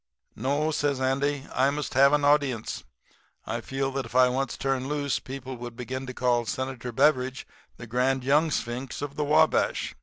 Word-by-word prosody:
"'No,' 145 +6 0
says 145 -3 0
Andy, 140 +2 0
'I 130 +2 +3
must 145 0 -3
have 140 +1 +6
an 145 -1 +2
audience. 140 -6 +1 0.6
I 115 +1 -3
feel 135 +3 -2
like 135 0 -2
if - - -14
I 125 0 +6
once 130 +1 -2
turned 135 -1 -1
loose 145 -3 -1
people 130 -1 -7
would 120 0 -8
begin 130 +2 -5
to 130 - -5
call 120 -2 +1
Senator 130 -2 -4
Beveridge 130 0 +2 0.3
the 115 - -8
Grand 125 +3 0
Young 150 +5 +3
Sphinx 125 0 -3
of 145 -1 -5
the 150 - -1
Wabash. 155 +2 +2
135 Hz, 180 wpm, -27 LUFS, 125-145 Hz, 0.6 s, have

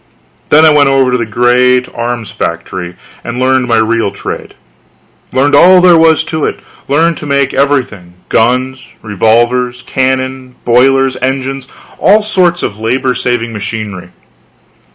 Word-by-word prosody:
Then 155 +2 +5
I 155 - +6
went 145 -2 +3
over 135 -2 +2
to 125 - +1
the 115 - -3
great 125 +3 +2
arms 120 -2 -4
factory 85 +1 -5 0.3
and 120 +1 -5
learned 130 0 +1
my 115 -2 +1
real 110 -1 0
trade; - - -7 0.8
learned 140 +3 +1
all 180 +6 +6
there 180 -1 +5
was 160 -1 +3
to 160 -1 -4
it; - - -2 0.3
learned 165 +4 +1
to 150 - -8
make 140 -1 0
everything: 130 -11 -1
guns, 130 +3 0 0.2
revolvers, 120 +4 0
cannon, 130 -1 -2
boilers, 130 +2 +2
engines, 135 0 -3 0.3
all 210 +2 +3
sorts 180 -4 0
of 105 - -4
labor 125 +3 -1
saving 120 -1 -2
machinery. 105 -3 -6
130 Hz, 140 wpm, -11 LUFS, 115-140 Hz, 0.8 s, I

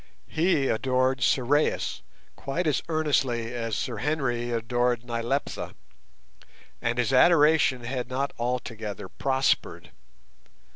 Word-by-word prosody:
He 155 -4 +2
adored 130 +2 +1
Sorais 135 +5 +1 0.3
quite 165 +6 -3
as 150 -3 +1
earnestly 135 -7 0
as 115 -3 -2
Sir - - -3
Henry 130 -6 -1
adored 120 +1 0
Nyleptha, 120 +4 -3 1.1
and 120 +1 -1
his 125 +1 +1
adoration 150 -3 +5
had 125 0 -4
not 135 +2 -2
altogether 115 -4 -3
prospered. 135 -1 -1
130 Hz, 100 wpm, -26 LUFS, 120-140 Hz, 1.1 s, adoration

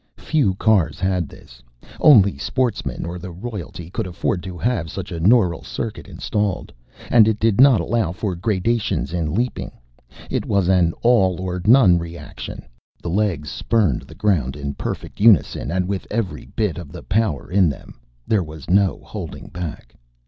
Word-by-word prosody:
Few 140 - +1
cars 95 -8 +2
had 95 -4 0
this; - - -16 0.4
only 105 -10 +6
sportsmen 100 - -2
or 85 +1 -5
the 90 +2 -7
royalty 90 -3 -7
could 95 - -3
afford 90 0 -2
to 90 0 -7
have 110 -6 -1
such - - -6
a 85 - -4
neural 90 -2 +3
circuit - - -5
installed. 105 -3 -2 0.4
And 110 -3 +7
it 110 -1 +1
did 110 +1 +3
not 135 -4 +6
allow 110 -6 0
for 100 0 -3
gradations 105 +2 -1
in 85 -2 -1
leaping. 120 +3 -2 0.6
It - - -1
was 100 -3 +1
an 90 -3 +3
all 95 -7 +3
or 90 -1 -3
none 105 -7 +6
reaction; 85 0 -8 0.4
the 85 - -5
legs 90 -7 0
spurned 100 - +1
the - - -13
ground 75 -11 0
in 70 -1 -4
perfect - - -6
unison 100 - +4
and 90 +2 0
with 100 -1 -3
every 110 -4 -3
bit 105 -6 0
of 80 -5 -9
the 85 - -9
power 100 - -1
in 95 -3 +4
them. 70 - -9 0.3
There 105 -3 +2
was 80 0 -8
no 100 0 +3
holding - - -7
back. 85 -4 -7
95 Hz, 165 wpm, -21 LUFS, 85-110 Hz, 0.6 s, And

